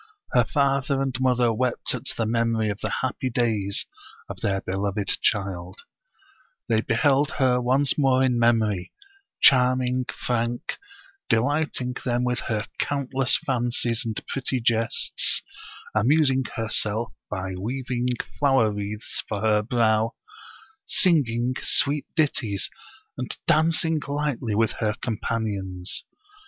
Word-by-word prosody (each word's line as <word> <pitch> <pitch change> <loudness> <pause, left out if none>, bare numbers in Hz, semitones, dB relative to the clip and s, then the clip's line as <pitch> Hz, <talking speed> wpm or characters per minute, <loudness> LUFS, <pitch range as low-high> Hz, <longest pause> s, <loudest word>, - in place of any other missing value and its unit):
Her - - +4
father 140 -1 +1
and 135 -2 -1
mother 125 -2 +2
wept 125 +2 -1
at - - -5
the 115 - 0
memory 115 -1 +1
of 100 - -6
the - - -3
happy 130 0 -2
days 110 -5 0 0.4
of - - -8
their 95 -2 0
beloved 100 +1 -2
child; 95 -3 -1 0.9
they 110 -2 +2
beheld 140 +5 +2
her 125 -3 +3
once 135 +4 +2
more 130 -2 +3
in 125 -2 +2
memory; 110 -5 +1 0.5
charming, 125 -1 +4 0.2
frank, 120 0 -2 0.5
delighting 125 +1 0
them 120 -1 0
with 125 -1 0
her 110 -1 -1
countless 135 -2 +2
fancies 120 -2 0
and 110 -2 -2
pretty 130 -1 -2
jests, 115 0 +1 0.5
amusing 135 +3 +3
herself 115 -1 -1 0.2
by 95 -2 -4
weaving 125 +5 -3 0.3
flower 135 -6 +3
wreaths 105 +1 -3
for 105 -2 -3
her 105 -1 +3
brow, 110 0 +1 0.7
singing 130 - +2
sweet 140 +1 +3
ditties, 125 - 0 0.5
and 125 - -4
dancing 160 0 +3
lightly 140 -6 -2
with 115 +1 +2
her 110 -2 0
companions. 100 -5 -3
120 Hz, 120 wpm, -24 LUFS, 110-130 Hz, 0.9 s, Her